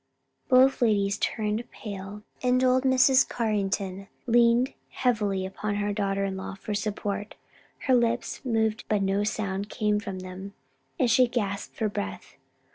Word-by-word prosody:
Both 260 +1 +5
ladies 200 -4 +2
turned 215 +1 -1
pale, 205 -1 -8 0.2
and 255 0 +2
old 255 +1 +3
Mrs. 260 0 +5
Carrington 195 -3 -2 0.2
leaned 240 +1 +4 0.2
heavily 210 -7 0
upon 205 +2 -3
her 205 0 -1
daughter 195 -1 0
in 195 -1 -3
law 190 0 -6
for 210 +2 -5
support. 205 0 -3 0.5
Her 260 - +3
lips 240 -1 +1
moved 220 -3 0
but 210 -2 +2
no 195 +1 +1
sound 200 -1 -2
same 210 -1 +1
from 195 -2 -6
them, 185 +2 -8 0.4
and 255 -7 +2
she 250 +3 +5
gasped 205 -5 -3
for 220 - 0
breath. 95 - -5
210 Hz, 145 wpm, -27 LUFS, 195-240 Hz, 0.5 s, Both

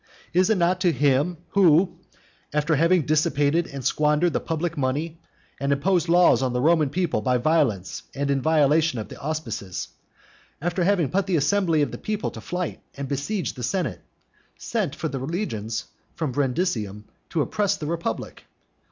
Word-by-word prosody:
Is 185 +3 +3
it 220 - +3
not 180 +1 +2
to 180 -2 +4
him 145 +3 +2
who, 175 -1 +4 0.5
after 150 +2 +1
having 165 +3 +3
dissipated 155 +2 +2
and 140 -2 -7
squandered 150 +3 +2
the - - +1
public 165 +1 -2
money, 150 +5 -2 0.4
and 140 0 0
imposed 175 +4 +1
laws 175 -8 +5
on 130 -2 0
the 125 - 0
Roman 155 +1 +3
people 170 -7 0
by 125 +3 +2
violence 120 - +1
and 140 0 -1
in 135 -1 +1
violation 155 -1 +3
of 110 - -5
the - - -10
auspices, 135 - -4 0.7
after 175 +3 -1
having 175 -6 +2
put 195 +1 +1
the 185 - +1
assembly 160 +1 +2
of - - -2
the - - -7
people 215 -1 -2
to - - -9
flight 180 -1 -4 0.2
and 140 0 -4
besieged 145 - -2
the 125 - -8
senate, 180 +10 -2 0.6
sent 210 - -2
for 160 - -3
the 140 -3 -4
legions 125 - -3 0.3
from 155 -5 -2
Brundusium 125 - -1 0.3
to 160 - 0
oppress 200 +3 0
the 155 - -6
republic? 165 -7 -4
155 Hz, 170 wpm, -24 LUFS, 140-175 Hz, 0.7 s, laws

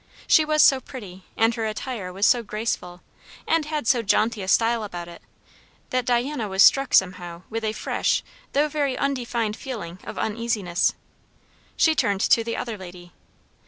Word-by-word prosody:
She 315 - +5
was 305 0 +3
so 270 - +6
pretty, 190 -9 -10
and 225 +1 +3
her 225 -1 -2
attire 215 -3 -5
was 195 +3 0
so 245 0 +4
graceful, 210 -5 -4 0.4
and 325 -2 +2
had 300 -4 -3
so 240 +1 +3
jaunty 220 +1 +1
a 190 - -5
style 230 +2 +2
about 175 -4 -6
it, 170 -1 -12 0.7
that 255 -1 -1
Diana 245 -1 0
was 190 +1 +4
struck 275 -1 +5
somehow 180 -2 0
with 225 +1 -3
a 215 - 0
fresh - - -1 0.3
though 290 +2 +3
very 285 -3 -1
undefined 240 -5 -1
feeling 205 -11 -7
of - - -8
uneasiness. 215 -5 0 0.8
She 320 - +4
turned 205 -9 0
to 230 - +4
the 230 0 -3
other 225 -4 -4
lady. 175 -1 -11
225 Hz, 165 wpm, -24 LUFS, 190-255 Hz, 0.8 s, so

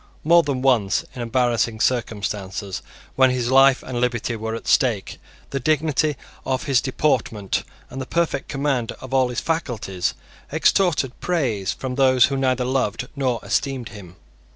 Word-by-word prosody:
More 170 +2 +6
than 140 -5 -3
once, 115 -7 +2
in 125 - -6
embarrassing 115 -2 0
circumstances, 100 -5 -2 0.3
when 130 0 +5
his 125 -1 -1
life 135 0 +6
and 120 -2 -4
liberty 120 -1 -1
were 110 0 -4
at 115 - -7
stake, 115 -7 +1 0.3
the 135 - -1
dignity 155 +1 +1 0.3
of 130 -1 -1
his 135 -2 +2
deportment 125 -7 0 0.3
and 130 - -5
his 130 - -6
perfect 170 -1 -1
command 135 -4 -1
of 130 0 -10
all 130 -1 +4
his 125 - -3
faculties 120 - -2 0.4
extorted 155 -9 +2
praise 125 - 0
from 130 -1 -5
those 130 -2 +5
who 140 - -2
neither 130 -2 +1
loved 125 -2 -1
nor 130 -4 0
esteemed 135 -4 -1
him. 95 -4 -12
130 Hz, 155 wpm, -22 LUFS, 115-135 Hz, 0.4 s, More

